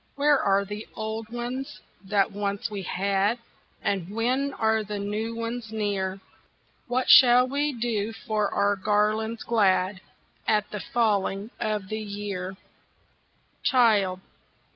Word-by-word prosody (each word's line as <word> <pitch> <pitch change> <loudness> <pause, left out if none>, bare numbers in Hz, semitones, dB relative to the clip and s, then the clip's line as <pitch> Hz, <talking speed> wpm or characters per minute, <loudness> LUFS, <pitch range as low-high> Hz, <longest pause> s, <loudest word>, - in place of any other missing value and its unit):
Where 290 0 +4
are 200 0 +2
the 205 +2 -7
old 220 0 -4
ones 240 0 -5 0.3
that 200 0 +2
once 200 +1 -3
we 200 -2 -4
had, 195 +4 0 0.5
And 190 -3 -1
when 250 +6 0
are 220 -2 +1
the 210 0 -5
new 210 +3 -3
ones 230 -1 -4
near? 200 -3 -2 0.7
What 255 +1 0
shall 250 0 +8
we 285 +3 0
do 225 -3 -1
for 215 -2 -2
our 200 0 +2
garlands 215 +3 0
glad 190 -4 +2 0.5
At 210 -1 +1
the 210 - -4
falling 205 -2 0
of 210 -3 -2
the 215 - -3
year?" 200 -3 -5 1.0
"Child! 205 -7 +3
215 Hz, 125 wpm, -26 LUFS, 200-230 Hz, 1.0 s, shall